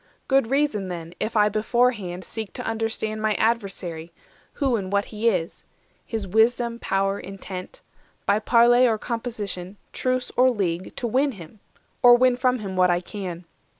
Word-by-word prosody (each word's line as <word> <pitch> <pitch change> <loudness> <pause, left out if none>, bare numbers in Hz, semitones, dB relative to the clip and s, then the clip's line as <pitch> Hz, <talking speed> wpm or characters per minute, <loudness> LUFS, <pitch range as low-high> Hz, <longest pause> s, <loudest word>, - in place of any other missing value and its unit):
Good 270 -4 +3
reason, 270 -8 +1
then, 170 -2 -6
if 220 +1 -2
I 210 0 +5
beforehand 210 -4 0
seek 220 +2 -6
To - - -6
understand 220 -1 -2
my 215 -1 +1
adversary, 190 -7 -2 0.4
who 270 -4 +1
And 195 -3 -3
what 200 0 +1
he 220 +2 0
is; 170 -6 -3 0.4
his 220 -3 -4
wisdom, 235 +3 +2
power, 195 -1 0
intent; 185 -1 -8 0.4
By 205 +1 +3
parle 240 +2 +5
or 225 -2 +1
composition, 210 -5 -5 0.2
truce 255 -1 -1
or 255 +1 +5
league, 185 -6 -2
To - - -4
win 265 +4 +1
him, 190 +1 -12 0.4
or 245 0 +9
win 250 0 +4
from 250 0 +1
him 195 -4 -6
what 185 0 +4
I 175 0 +2
can. 180 -2 -7
215 Hz, 160 wpm, -24 LUFS, 190-240 Hz, 0.4 s, or